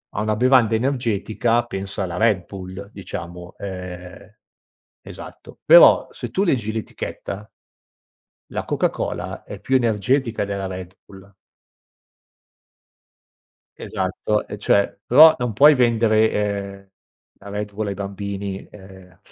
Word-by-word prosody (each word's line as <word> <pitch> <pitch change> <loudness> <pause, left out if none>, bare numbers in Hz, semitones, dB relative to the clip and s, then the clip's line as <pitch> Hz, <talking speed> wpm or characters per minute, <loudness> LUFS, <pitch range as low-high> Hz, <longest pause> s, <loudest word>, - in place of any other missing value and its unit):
a - - -1
una 110 0 0
bevanda 125 -2 +4
energetica, 120 -2 0
pensa 100 -3 -5
alla 90 -2 -5
Red 105 -5 +2
Bull, 95 +1 -9
diciamo, 90 -2 -8
ehm 90 +1 -9 0.7
esatto, - - -12
però - - +7
se - - -7
tu 195 - 0
leggi 120 - 0
l'etichetta 105 -1 -6 1.0
la - - -4
Coca-Cola - - -3
è 100 - -9
più 130 +6 +1
energetica 120 +1 0
della 100 -1 -4
Red 95 0 -8
Bull. 95 0 -16 2.5
Esatto, 95 +3 -2
e 105 - -8
cioè 100 -1 +2
però 155 +5 +8
non 120 -3 -2
puoi 145 +6 +7
vendere, 115 -3 +3
ehm, 100 -1 -3 0.5
la 100 - -13
Red 105 0 -5
Bull 105 +1 -3
ai 100 - -3
bambini, 100 0 -6
uhm, 95 -2 -15
105 Hz, 120 wpm, -21 LUFS, 95-115 Hz, 2.5 s, però